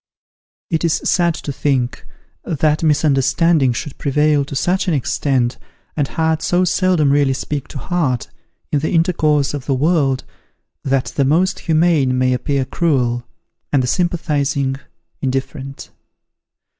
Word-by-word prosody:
It 165 0 0
is 165 -2 +2
sad 170 0 +1
to 145 - -5
think, 130 -4 -1 0.4
that 155 -1 0
misunderstanding 150 -1 +3
should 130 +4 -6
prevail 150 +1 +2
to 140 - -7
such 185 +7 0
an 170 - +2
extent, 130 -2 0 0.4
and 145 -3 0
heart 160 0 0
so 180 +2 +2
seldom 180 -5 +2
really 140 -1 +3
speak 140 0 -4
to - - -8
heart, 135 - -1 0.4
in 145 - +2
the 155 - -2
intercourse 155 -4 +2
of 140 -3 -6
the 135 - +1
world, 140 -3 +1 0.6
that 135 -1 -1
the 140 - +2
most 165 +7 +2
humane 155 -5 +2
may 130 0 +2
appear 135 +2 -1
cruel, 125 -6 0 0.4
and 135 -3 +2
the - - -1
sympathizing 145 -5 0 0.4
indifferent. 135 +1 -4
145 Hz, 135 wpm, -18 LUFS, 135-165 Hz, 0.6 s, misunderstanding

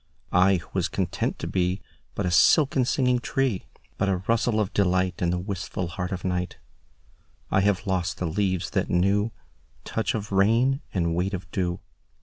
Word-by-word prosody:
I 95 +2 +5
who 85 - -5
was - - +1
content - - -2
to - - -5
beBut 90 0 0 0.5
a 90 - 0
silken 135 - +5
singing 125 -1 +2
tree, 125 -5 -1 0.3
But 100 - +2
a 95 -1 -1
rustle 115 -1 +2
of 105 -1 -1
delightIn 90 -2 +1
the 90 - 0
wistful 90 -1 -4
heart 90 +1 -4
of 95 -1 -4
night,I 90 +1 -5
have 100 0 +1
lost 90 -5 -1
the 90 - -2
leaves 90 0 -1
that - - 0
knewTouch 105 +4 -2
of 105 -1 -4
rain 115 +8 +3
and 85 -3 0
weight 95 +4 0
of 95 - -9
dew. 90 -2 -1
95 Hz, 155 wpm, -26 LUFS, 90-105 Hz, 0.5 s, I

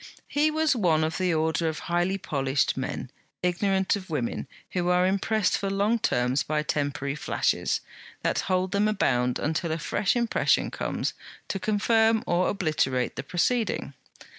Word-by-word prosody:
He 295 +2 +2
was 310 -2 +2
one 170 -8 +2
of 160 +3 -2
the 185 -1 +1
order 160 0 +1
of 155 - -4
highly 175 +3 +1
polished 135 -6 0
men, - - -4 0.3
ignorant 190 +2 +1
of 190 -2 -8
women, 135 -7 -2 0.2
who 180 -1 0
are 180 0 +4
impressed 200 +2 +1
for 195 - -2
long 205 +4 +1
terms 125 - +1
by 150 0 -1
temporary 145 -2 -1
flashes, 150 - 0 0.4
that - - +1
hold 185 0 +1
them 200 +1 +2
bound 125 -7 +1
until 160 +2 -1
a 160 - 0
fresh 185 +6 0
impression 235 -1 +2
comes, - - -2 0.4
to 195 - -2
confirm 220 +2 +2
or 175 +1 +2
obliterate 155 -9 0
the - - -3
preceding. 185 - 0
180 Hz, 155 wpm, -26 LUFS, 155-200 Hz, 0.4 s, are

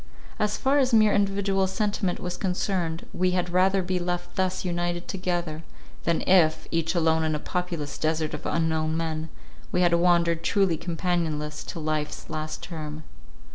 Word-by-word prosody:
As 210 0 +1
far 275 +2 +3
as 255 -3 +3
mere 215 -1 +5
individual 195 -1 +2
sentiment 195 -1 -1
was 180 0 -4
concerned, 180 -3 -1
we 185 0 +1
had 180 0 -1
rather 190 +1 +3
be 185 0 -1
left 175 0 -3
thus 185 0 0
united 175 0 -2
together, 175 -4 -2 0.4
than 170 -1 +2
if, 165 -4 +4
each 165 +1 0
alone 160 -1 +3
in 155 -1 +1
a - - -2
populous 170 -4 -3
desert 155 -1 0
of - - -4
unknown 160 -1 0
men, 160 -1 -2 0.4
we 180 - +2
had 175 -1 +4
wandered 170 -1 +3
truly 195 -2 +2
companionless 160 -3 -2
till 165 - -6
life's 155 0 -3
last 155 0 -4
term. 155 -2 -6
175 Hz, 160 wpm, -26 LUFS, 160-185 Hz, 0.4 s, mere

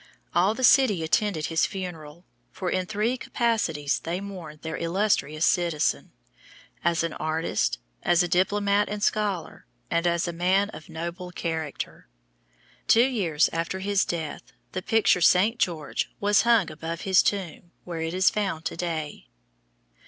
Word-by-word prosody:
All 185 +6 +3
the 260 - -4
city 235 -10 +5
attended 160 -1 0
his 165 0 +1
funeral, 170 -3 -7 0.3
for 185 -2 -3
in 185 -1 -1
three 215 +5 0
capacities 195 -15 0
they 170 +2 -3
mourned 180 -7 -9
their 160 0 -4
illustrious 165 -4 0
citizen 170 -5 +1 0.7
as 170 -1 +2
an 165 - -2
artist, 155 - -1 0.2
as 175 +1 +3
a - - -1
diplomat 200 +3 +2
and 205 0 -4
scholar, 205 - -1 0.2
and 170 +1 +1
as 170 0 +1
a 170 - -3
man 190 +4 +2
of 155 +1 -11
noble 170 +3 -6
character. 160 - -5 0.8
Two 235 +2 +6
years 185 - +1
after 165 +3 -2
his 200 +1 +1
death 155 -6 -5 0.2
the 185 - -3
picture 200 -3 +3
"St. 195 +8 +4
George" 160 -5 -1
was 205 +1 +4
hung 230 -6 +3
above 165 +2 -6
his 190 -2 +4
tomb 180 -4 -2
where 170 -2 -5
it 165 +2 -3
is 185 +1 +4
found 190 -7 -2
to - - -2
day. 160 - -4
175 Hz, 150 wpm, -26 LUFS, 160-200 Hz, 0.8 s, Two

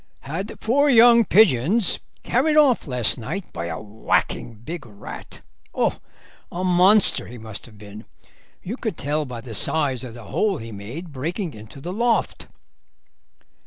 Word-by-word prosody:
"Had 165 +9 -6
four 285 +6 +2
young 235 -2 +7
pigeons 190 - +4 0.2
carried 300 +5 +2
off 275 - +4
last 125 -3 +1
night 165 - -6
by 85 - -4
a - - -4
whacking 110 +2 -2
big 145 +9 -7
rat. 105 -3 -11 0.3
Oh, - - 0 0.5
a 180 +2 -4
monster 185 +3 +4
he 120 - -10
must 110 -1 -8
have 110 -3 -16
been; 105 +1 -11 0.6
you 220 +8 -5
could 220 - -4
tell 150 +1 -1
by 125 -3 -7
the 115 -1 -9
size 135 +3 0
of 120 -3 -8
the 120 - -10
hole 195 - 0
he 115 -2 -8
made 120 - -8
breaking 165 - -3
into 110 +5 -12
the 175 +6 -6
loft." 235 +2 0
155 Hz, 155 wpm, -23 LUFS, -, 0.6 s, young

